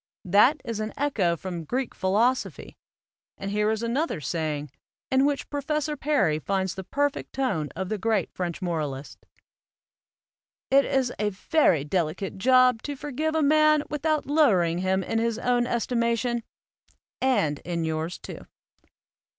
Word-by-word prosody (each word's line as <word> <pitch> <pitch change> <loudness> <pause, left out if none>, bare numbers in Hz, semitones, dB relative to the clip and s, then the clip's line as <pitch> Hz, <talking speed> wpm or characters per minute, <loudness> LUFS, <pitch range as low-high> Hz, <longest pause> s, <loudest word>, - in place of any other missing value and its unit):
That 210 - +4
is 230 -3 -3
an 215 0 -3
echo 200 -12 +1
from 175 -1 -5
Greek 250 - -2
philosophy; 220 +7 0 0.6
and 195 - -5
here 210 +1 +1
is 220 +1 -1
another 240 - -1
saying, 150 -1 -3 0.4
in 265 +1 +4
which 285 -1 -2
Professor 300 +1 -1
Perry 275 - +1
finds 190 +1 -1
the 190 - -6
perfect 285 +8 -2
tone 190 - -1
of 185 +1 -4
the 215 - -2
great 215 -3 0
French 180 0 -4
moralists: 150 -5 -3 1.5
"It 275 +1 +6
is 265 -3 0
a 210 0 +1
very 195 - +2
delicate 175 +4 -2
job 255 0 +5
to 290 - -5
forgive 295 +3 -3
a 315 - +2
man 305 0 +4
without 305 0 0
lowering 200 - +3
him 190 +1 +1
in 225 - -1
his 230 -1 0
own 245 0 +1
estimation, 235 0 0 0.8
and 160 - +1
in 170 -2 -3
yours 160 +2 -2
too." - - -10
225 Hz, 140 wpm, -26 LUFS, 180-270 Hz, 1.5 s, It